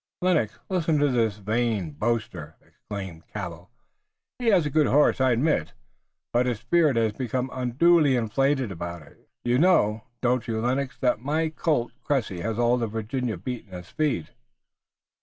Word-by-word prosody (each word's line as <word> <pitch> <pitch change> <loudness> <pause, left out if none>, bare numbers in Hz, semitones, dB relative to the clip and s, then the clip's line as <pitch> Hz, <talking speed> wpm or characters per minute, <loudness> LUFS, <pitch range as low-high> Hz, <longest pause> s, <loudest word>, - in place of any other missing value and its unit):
"Lennox, 160 - +1
listen 165 -4 +1
to 145 0 +3
this 115 -5 +1
vain 105 -4 -1
boaster!" 90 -3 -3
exclaimed 95 -5 -8
Cabell. 90 -4 -7 0.7
"He 245 - -2
has 190 -7 +4
a 150 - -2
good 155 0 +3
horse, 145 -1 +3
I 130 -1 +4
admit, 120 - 0 0.6
but 125 +1 +2
his 120 -3 0
spirit 150 +3 +2
has 110 -2 +1
become 130 +2 -2
unduly 140 +4 +3
inflated 130 +1 +1
about 85 -2 -6
it. - - -21
You 120 +1 +2
know, 115 - +3
don't 125 0 0
you, 110 -1 -1
Lennox, 125 +1 -1
that 125 -3 +2
my 155 +6 0
colt, 150 -6 0
Cressy, 115 -10 -1
has 110 +3 -2
all 120 +1 +3
Virginia 115 0 -2
beaten 105 -1 -6
in 90 - -7
speed?" 145 - -2
120 Hz, 155 wpm, -25 LUFS, 105-140 Hz, 0.7 s, has